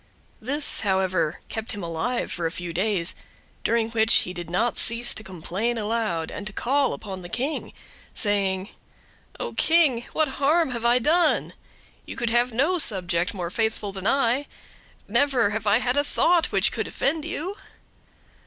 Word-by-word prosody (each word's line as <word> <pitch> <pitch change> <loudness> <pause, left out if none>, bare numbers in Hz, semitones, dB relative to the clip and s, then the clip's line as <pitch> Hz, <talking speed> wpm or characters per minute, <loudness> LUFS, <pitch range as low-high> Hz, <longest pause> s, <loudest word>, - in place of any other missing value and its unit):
This, 285 +6 +3
however, 185 -5 0
kept 220 +2 -3
him 205 -3 -6
alive 170 +10 -2
for 170 -1 -2
a - - -5
few 175 -1 -6
days, 185 -1 0 0.5
during 230 -1 0
which 225 0 +2
he 180 - -6
did 175 -2 -7
not 225 +7 0
cease 235 +1 +4
to 220 - -3
complain 190 +6 -3
aloud, 215 -7 -2
and 205 - -6
to 210 - -7
call 275 +4 +1
upon 195 -4 -7
the 175 - -9
King, 265 - -3 0.4
saying: 200 -3 0 0.7
"Oh - - -4
King, 320 -8 +3
what 315 - +1
harm 310 +1 +3
have 235 -1 -4
I 240 +1 +5
done? 320 +8 +2 0.5
You - - -8
have 240 +2 +2
no 310 +10 +1
subject 180 - +3
more 175 -2 -4
faithful 220 -1 -1
than 195 +1 -4
I. 270 +1 +2 0.6
Never 260 -7 +2
have 210 0 -3
I 205 +2 +5
had 250 +1 0
a 285 - +3
thought 345 +3 +2
which - - +3
could - - -3
offend 305 +3 -1
you." 345 +4 -4
225 Hz, 160 wpm, -24 LUFS, 190-270 Hz, 0.7 s, I